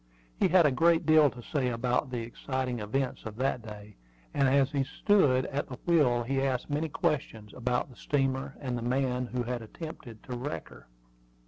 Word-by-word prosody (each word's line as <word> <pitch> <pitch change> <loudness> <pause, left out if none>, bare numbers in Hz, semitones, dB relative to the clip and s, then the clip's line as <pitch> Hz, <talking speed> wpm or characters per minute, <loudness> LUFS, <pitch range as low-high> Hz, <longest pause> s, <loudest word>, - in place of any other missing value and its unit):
He - - +4
had 180 -1 +5
a 145 - +4
great 165 +4 +3
deal 155 -2 +6
to 125 -2 -11
say 135 -1 -1
about 125 +3 0
the 125 -2 -3
exciting 125 +1 -3
events 125 +5 -2
of 110 -1 -7
that 130 0 0
day; 105 -2 -11 0.4
and 135 - +3
as 135 0 +3
he 140 -2 +1
stood 135 -6 +3
at 145 +1 -3
the 125 - -7
wheel 140 -9 +3
he 135 +3 0
asked 135 +1 -1
many 155 +2 0
questions 110 -8 -2
about 125 0 -1
the 130 - -16
steamer 135 0 -1
and 130 -3 -3
the 120 - -3
man 125 0 0
who 125 0 -2
had 120 0 -3
attempted 120 -2 -9
to 125 - -6
wreck 130 +5 -5
her. - - -15
130 Hz, 195 wpm, -29 LUFS, 120-140 Hz, 0.4 s, deal